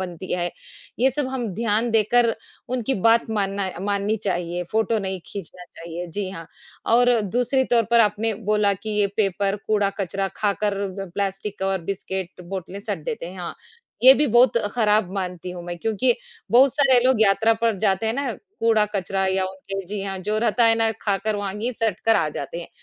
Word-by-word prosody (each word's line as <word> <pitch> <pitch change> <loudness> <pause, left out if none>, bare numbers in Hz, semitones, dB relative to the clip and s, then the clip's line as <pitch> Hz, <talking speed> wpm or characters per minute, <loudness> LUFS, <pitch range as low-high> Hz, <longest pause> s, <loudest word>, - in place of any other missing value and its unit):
बनती 180 0 -6
है। 175 -1 -1 0.5
ये 260 +2 +4
सब 290 +1 -2
हम 260 -3 -3
ध्यान 225 +2 0
देकर 230 +1 +3 0.3
उनकी 255 +1 -1
बात 230 0 +4
मानना 200 -2 -1
माननी 200 +2 0
चाहिए। 175 -2 -1
फ़ोटो 220 0 +1
नहीं 190 -2 -4
खींचना 180 -2 -8
चाहिए। 170 0 -8
जी 190 +3 -4
हाँ, 165 -4 -8 0.4
और 240 0 +4
दूसरी 245 +6 +1
तौर 235 - +5
पर 235 0 +6
आपने 215 0 +1 0.2
बोला 210 -1 +3
कि 215 +3 -7
ये 205 - +4
पेपर 200 -1 +1
कूड़ा-कचरा 195 -2 0
खाकर 205 0 0 0.2
ब 195 -3 -5
प्लास्टिक 195 0 -3
और 195 -1 0
बिस्किट 190 0 -5
बोतलें 190 0 -5
सट 205 -4 -3
देते 225 -2 -4
हैं। 185 +2 -9
हाँ, 175 - -5 0.5
ये 260 +1 +11
भी 295 +2 +2
बहुत 240 0 +4 0.2
ख़राब 210 -4 +2
मानती 180 -2 -4
हूँ 180 -1 -7
मैं 175 0 -5
क्योंकि 225 +5 +1 0.4
बहुत 260 +2 +6
सारे 270 -3 +5
लोग 255 -3 +3
यात्रा 220 +2 +4
पर 225 -1 0
जाते 195 +1 +1
हैं 220 - +1
ना 275 -2 -1 0.3
कूड़ा-कचरा 210 -4 +1
या 190 0 +1
उनके 190 +1 -6
जी 205 +1 -4
हाँ, 195 -1 -3
जो 210 +3 -2
रहता 235 +1 +2
है 225 0 +5
ना 225 0 +2
खाकर 205 +1 0
वहाँ 200 -1 -3
गई 235 +4 -1
सट 225 -1 -1
कर 225 0 +5
आ 165 -6 +1
जाते 150 +3 -5
हैं। - - -9
205 Hz, 185 wpm, -23 LUFS, 190-225 Hz, 0.5 s, ये